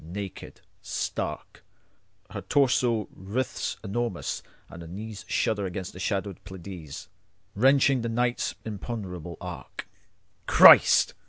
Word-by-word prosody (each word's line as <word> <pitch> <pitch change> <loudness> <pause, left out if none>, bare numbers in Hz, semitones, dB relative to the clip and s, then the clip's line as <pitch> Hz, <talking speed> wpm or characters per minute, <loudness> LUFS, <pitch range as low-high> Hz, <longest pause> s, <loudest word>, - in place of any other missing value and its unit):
Naked, 95 +4 -8 0.2
stark, - - -4 0.7
Her - - -5
torso 120 -6 +2
writhes 105 +7 -3
enormous, 110 -2 -3 0.3
and 85 - -11
her 85 - -9
kneesShudder 105 +1 -2
against 90 0 -6
the 90 - -10
shadowed 100 -1 -3
PleiadesWrenching 95 - -1
the 115 - -2
night's 120 +1 -1
imponderable 95 -6 -6
arc. - - -8 0.6
Christ! - - +8
100 Hz, 95 wpm, -27 LUFS, 90-120 Hz, 0.7 s, Christ